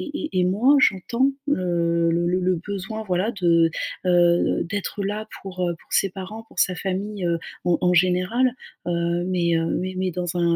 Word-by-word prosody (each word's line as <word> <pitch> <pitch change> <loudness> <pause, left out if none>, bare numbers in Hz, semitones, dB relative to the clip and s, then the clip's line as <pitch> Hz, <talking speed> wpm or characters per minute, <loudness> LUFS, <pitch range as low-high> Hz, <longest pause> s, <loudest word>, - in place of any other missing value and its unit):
et 315 - -3
et - - +3
et 180 - +3
moi, 230 +10 +4
j'entends 235 +4 +2 0.2
le 170 -8 +1
le 170 +1 +1
le 180 +1 +1
le 185 0 +1
besoin, 205 +2 -4
voilà, 190 +1 0
de, 170 -2 +4 0.4
heu - - +2
heu, 175 -1 +3
d'être 205 +1 -4
là 210 +2 -3 0.2
pour 185 -1 -8
heu, 175 -1 0
pour - - -13
ses 195 - +3
parents, 190 +4 -8
pour - - -20
sa 185 - +3
famille, 195 +3 -3
heu, 170 -1 +1 0.3
en 175 -1 +3
en 180 0 +3
général, 185 +8 +3 0.4
heu, 170 0 0
mais 170 -2 +1
heu, 165 - 0
mais 185 +1 -3
mais 185 0 0
dans 175 0 -3
un, 170 -1 +2
185 Hz, 200 wpm, -23 LUFS, 175-200 Hz, 0.4 s, moi